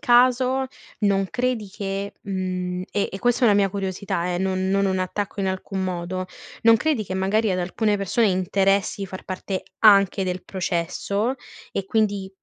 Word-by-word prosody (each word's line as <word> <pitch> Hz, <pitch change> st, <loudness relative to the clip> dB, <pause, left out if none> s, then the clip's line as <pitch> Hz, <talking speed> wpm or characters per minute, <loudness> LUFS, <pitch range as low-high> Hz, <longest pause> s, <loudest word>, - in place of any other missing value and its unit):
caso 255 Hz, 0 st, +4 dB, 0.3 s
non 195 Hz, -2 st, +2 dB
credi 245 Hz, -5 st, -1 dB
che, 195 Hz, 0 st, -4 dB
mhmm, 185 Hz, -2 st, -3 dB
e 205 Hz, -, 0 dB
e 195 Hz, -, -4 dB
questa 245 Hz, 0 st, +1 dB
è -, -, +7 dB
una 205 Hz, -, +5 dB
mia 200 Hz, -2 st, +3 dB
curiosità, 190 Hz, -2 st, -2 dB
eh, -, -, -1 dB
non 190 Hz, 0 st, 0 dB
non 195 Hz, +1 st, +2 dB
un 190 Hz, -1 st, 0 dB
attacco 200 Hz, +3 st, -3 dB
in 195 Hz, -, 0 dB
alcun 190 Hz, 0 st, -2 dB
modo. 185 Hz, +1 st, -3 dB, 0.4 s
Non 225 Hz, 0 st, +7 dB
credi 275 Hz, -4 st, 0 dB
che 185 Hz, -, -5 dB
magari 195 Hz, +2 st, +1 dB
ad 180 Hz, -, 0 dB
alcune 205 Hz, +4 st, 0 dB
persone 200 Hz, +3 st, +1 dB
interessi 195 Hz, +1 st, +1 dB
di -, -, -3 dB
far 185 Hz, +1 st, -8 dB
parte 185 Hz, 0 st, -4 dB, 0.2 s
anche 200 Hz, -2 st, +5 dB
del 180 Hz, 0 st, -3 dB
processo, 200 Hz, +6 st, -1 dB, 0.3 s
e 195 Hz, -, -3 dB
quindi 205 Hz, -2 st, 0 dB
195 Hz, 175 wpm, -23 LUFS, 185-210 Hz, 0.4 s, è